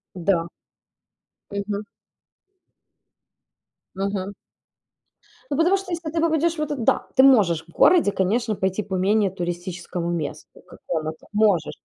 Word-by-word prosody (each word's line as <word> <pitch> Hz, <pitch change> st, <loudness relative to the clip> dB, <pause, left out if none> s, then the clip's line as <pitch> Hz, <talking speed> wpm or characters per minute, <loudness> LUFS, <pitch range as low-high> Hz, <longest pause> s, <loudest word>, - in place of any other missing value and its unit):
Да. 175 Hz, -1 st, +1 dB, 1.0 s
Мгм. 200 Hz, +1 st, -3 dB, 2.1 s
Мгм. 195 Hz, 0 st, -3 dB, 1.2 s
Ну, 280 Hz, -, 0 dB
потому 350 Hz, +5 st, +4 dB
что, 385 Hz, -1 st, -7 dB
если 330 Hz, -2 st, -3 dB
ты 325 Hz, 0 st, -1 dB
попадешь 330 Hz, 0 st, +2 dB
в -, -, -5 dB
этот 290 Hz, -6 st, -2 dB
Да, -, -, +2 dB
ты 260 Hz, -, +6 dB
можешь 195 Hz, -12 st, +5 dB
в -, -, -37 dB
городе, 320 Hz, -, +4 dB
конечно, 215 Hz, +4 st, 0 dB
пойти 190 Hz, +2 st, -1 dB
по 195 Hz, -2 st, -6 dB
менее 200 Hz, +2 st, +2 dB
туристическому 175 Hz, -1 st, -4 dB
месту 160 Hz, -4 st, -5 dB
какому-то, 155 Hz, -1 st, -5 dB
можешь. 205 Hz, -7 st, +2 dB
200 Hz, 120 wpm, -23 LUFS, 175-270 Hz, 2.1 s, ты